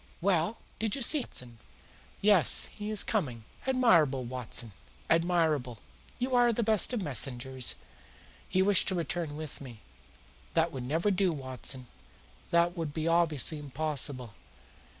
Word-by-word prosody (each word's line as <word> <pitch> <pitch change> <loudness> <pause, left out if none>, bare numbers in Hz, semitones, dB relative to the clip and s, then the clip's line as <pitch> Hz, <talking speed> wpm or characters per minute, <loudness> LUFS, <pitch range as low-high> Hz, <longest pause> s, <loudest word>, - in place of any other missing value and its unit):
"Well, 185 +3 0 0.2
did 220 -1 -1
you 275 - -2
see 300 +5 +5
him, 255 - -4
Watson?" 120 -2 -6 0.6
"Yes; 200 -5 +4
he 210 0 -6
is 215 -2 +6
coming." 130 - -2 0.2
"Admirable, 170 - +3
Watson! 120 -2 -5 0.4
Admirable! 160 -7 +1 0.4
You 255 +1 -3
are 245 -1 +4
the 235 +1 0
best 215 0 +3
of 235 -6 -2
messengers." 130 -3 +1 0.7
"He 185 - +2
wished 200 0 +3
to 190 - +1
return 165 -2 -3
with 155 -3 -8
me." 120 -6 -11 0.7
"That 165 0 +2
would 130 -2 -6
never 165 +9 0
do, 190 -1 +1
Watson. 130 -2 -4 0.6
That 170 +1 +2
would 160 -4 -5
be 160 0 -2
obviously 165 -3 +2
impossible. 140 -4 -1
160 Hz, 140 wpm, -29 LUFS, 130-195 Hz, 0.7 s, is